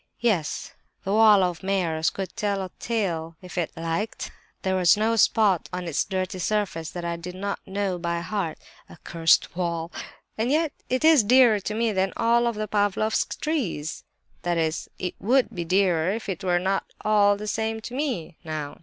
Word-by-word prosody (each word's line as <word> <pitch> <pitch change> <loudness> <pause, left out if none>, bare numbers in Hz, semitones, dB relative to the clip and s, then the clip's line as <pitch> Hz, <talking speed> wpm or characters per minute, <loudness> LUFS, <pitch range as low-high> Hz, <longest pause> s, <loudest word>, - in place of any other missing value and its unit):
"Yes, 205 -10 -1 0.3
that 195 - -1
wall 210 -2 +6
of 175 -2 -1
Meyer's 175 -5 0
could 195 -1 -6
tell 205 -3 -1
a 185 - -7
tale 170 -8 -2
if 180 -1 -11
it 175 -3 -1
liked. 165 +7 -3 0.3
There 190 0 +1
was 180 0 +5
no 220 +2 +2
spot 205 -4 +3
on 180 -1 -4
its 160 - 0
dirty 185 -1 -3
surface 180 -5 -1
that 175 0 -6
I 170 0 -2
did 180 +2 -8
not 200 +1 -3
know 195 -2 -2
by 170 0 -2
heart. 180 -4 -3 0.3
Accursed 165 -1 +1
wall! 170 -2 -2 0.5
and 230 +3 +1
yet 310 +1 +1 0.2
it 255 +4 +1
is 315 -7 +7
dearer 240 -1 +6
to 210 +2 -4
me 230 0 +1
than 190 -1 0
all 235 +1 +3
the 215 -1 -4
Pavlofsk 210 +1 0
trees!—That 175 - -3
is—it 165 +2 -2
would 250 +2 +2
be 175 -4 -4
dearer 180 -2 +2
if 215 +1 -3
it 190 -2 -4
were 180 -1 +2
not 190 +2 0 0.2
all 205 -1 +4
the 210 - -6
same 220 +1 -2
to 240 - -8
me, 250 - -3
now! 155 -3 -5
195 Hz, 175 wpm, -25 LUFS, 170-215 Hz, 0.5 s, is